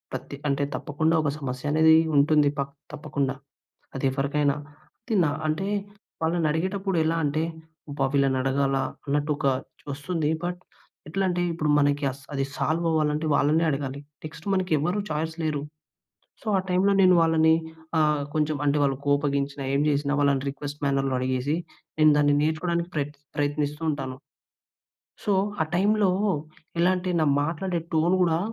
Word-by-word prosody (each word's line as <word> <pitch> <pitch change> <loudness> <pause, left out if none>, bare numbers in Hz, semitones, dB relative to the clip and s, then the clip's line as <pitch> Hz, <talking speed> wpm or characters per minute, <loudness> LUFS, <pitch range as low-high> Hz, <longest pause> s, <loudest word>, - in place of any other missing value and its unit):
పత్తి 140 - -7
అంటే, 140 +1 +1
తప్పకుండా 155 +3 0
ఒక 145 - +1
సమస్యనేదీ 150 +4 +3 0.2
ఉంటుంది 145 0 +4
పక్ 140 0 -3 0.2
తప్పకుండా, 140 -3 -2 0.6
అదెవ్వరికైనా. 140 +2 +1 0.5
తి 225 - 0
నా 145 - +1 0.2
అంటే, 190 +6 -1 0.6
వాళ్ళనడిగేటప్పుడెలా 165 +1 0
అంటే, 145 +2 0 0.5
"అబ్బా! 140 -1 0
వీళ్ళనడగాలా?" 135 0 +1 0.2
అన్నట్టొకా 145 0 +1 0.4
ఒస్తుంది, 150 +1 -2 0.2
బట్ 180 +1 -4 0.5
ఎట్లంటే, 180 0 0
ఇప్పుడు 155 -2 -1
మనకి 145 0 +1
అస్ 135 +1 -15
అది 135 - 0
సాల్వవ్వాలంటే, 155 -2 +1
వాళ్ళనే 155 +3 +3
అడగాలి. 140 0 -3 0.2
నెక్స్టు 160 +4 -9
మనకి 185 -1 -1
ఎవ్వరూ 175 +8 0
ఛాయిస్ 160 +1 -2
లేరు. 150 -2 -1 0.8
సో, - - -18
ఆ - - +1
టైంలో 185 +2 +3
నేను 185 -1 +6
వాళ్ళని 160 0 +4 0.4
ఆహ్, 150 -2 +2
కొంచెం 155 0 +1
అంటే, 145 0 +2
వాళ్ళు 135 -1 +2
కోపగించినా, 140 -1 0
ఏం 140 - +2
జేసినా, 145 0 +1
వాళ్ళని 140 -1 +2
రిక్వెస్ట్ 145 +1 -7
మ్యానర్‌లో 135 -1 +1
అడిగేసి, 130 +4 0 0.4
నేను 155 0 +6
దాన్ని 145 -1 +4
నేర్చుకోడానికి 170 +2 0
ప్రయత్ 145 -1 -2 0.2
ప్రయత్నిస్తూ 145 +1 -1
ఉంటాను. 135 -3 -4 1.1
సో, 205 - +2 0.3
ఆ - - -4
టైంలో 205 +1 +3 0.7
ఎలా 180 +2 +4
అంటే, 180 0 -2
నా - - +3 0.2
మాట్లాడే 170 +3 -2
టోన్ 170 +4 +3
గూడా 165 -1 +2
150 Hz, 135 wpm, -25 LUFS, 140-165 Hz, 1.1 s, నేను